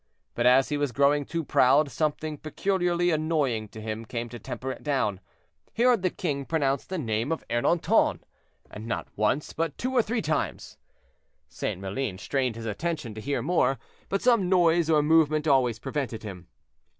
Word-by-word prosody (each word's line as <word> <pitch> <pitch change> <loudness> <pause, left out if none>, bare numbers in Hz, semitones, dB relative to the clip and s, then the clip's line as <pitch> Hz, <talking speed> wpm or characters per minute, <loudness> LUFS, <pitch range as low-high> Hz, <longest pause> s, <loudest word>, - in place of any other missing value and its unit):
But 120 +1 +1
as 130 +2 +5
he 150 - 0
was 145 -2 -1
growing 140 +2 +2
too 165 +3 -3
proud, 140 +2 +4
something 155 -1 -2
peculiarly 175 +1 0
annoying 150 -8 0
to 110 - -11
him 110 +1 -5
came 115 +1 -5
to 120 +1 -8
temper 130 +3 -5
it - - -8
down; 130 -10 0 0.6
he 230 - +1
heard 245 -5 +4
the 185 - +2
king 145 -6 -3
pronounce 140 -3 0
the 190 - -4
name 115 -1 -1
of 165 - -3
Ernanton, 120 +8 +2 0.5
and 110 +2 -8
not 115 - -3
once, 110 +8 0
but 165 -2 -2
two 255 +1 -2
or 250 - +5
three 230 +1 -2
times. 155 0 -3 0.7
St. - - -4
Maline 100 +1 -3
strained 130 +2 -1
his 115 0 -7
attention 135 +2 -3
to 110 - -8
hear 140 +4 -2
more, 135 -7 +2 0.3
but 195 - -1
some 230 -7 +3
noise 170 -3 +3
or 155 -2 +4
movement 155 0 +3
always 130 -5 +3
prevented 120 -3 -4
him. 95 -4 -8
145 Hz, 175 wpm, -27 LUFS, 120-165 Hz, 0.7 s, as